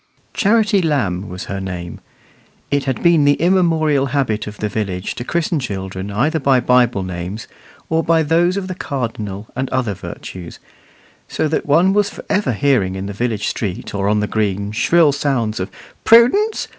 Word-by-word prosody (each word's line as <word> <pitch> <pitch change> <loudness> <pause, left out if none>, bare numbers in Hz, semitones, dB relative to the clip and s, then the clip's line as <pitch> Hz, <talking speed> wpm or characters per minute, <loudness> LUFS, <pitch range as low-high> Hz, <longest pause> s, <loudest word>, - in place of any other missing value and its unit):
Charity 210 -1 +3
Lamb 105 - -1
was 90 +1 -6
her 100 - -5
name. 90 -3 -6 0.7
It 140 -1 +1
had 130 -3 -2
been 170 -3 +5
the 145 0 +4
immemorial 160 -5 +2
habit 120 -6 -1
of 105 0 -8
the 105 - -2
village 100 -3 -3
to 120 - -6
christen 165 +3 -1
children 95 -5 -5
either 140 +11 0
by 135 -2 +3
Bible 120 -4 +2
names, 90 +5 -6 0.4
or 160 0 +1
by 165 0 +3
those 170 +4 +2
of 190 -2 -3
the 185 - -4
cardinal 110 - -5
and 130 +1 -2
other 120 -5 -1
virtues; 90 -1 -9 0.7
so 155 - -1
that 155 - -2
one 170 +6 +4
was 205 0 +2
for - - -11
ever 205 -9 +1
hearing 105 -6 +1
in 95 0 -4
the 100 - -5
village 110 0 -2
street 100 -5 -4
or 100 0 0
on 105 0 +2
the - - +1
green, 100 -2 -1
shrill 160 +7 +3
sounds 135 -6 -1
of 95 +2 -3 0.3
"Prudence! 260 - +4
125 Hz, 175 wpm, -18 LUFS, 100-160 Hz, 0.7 s, been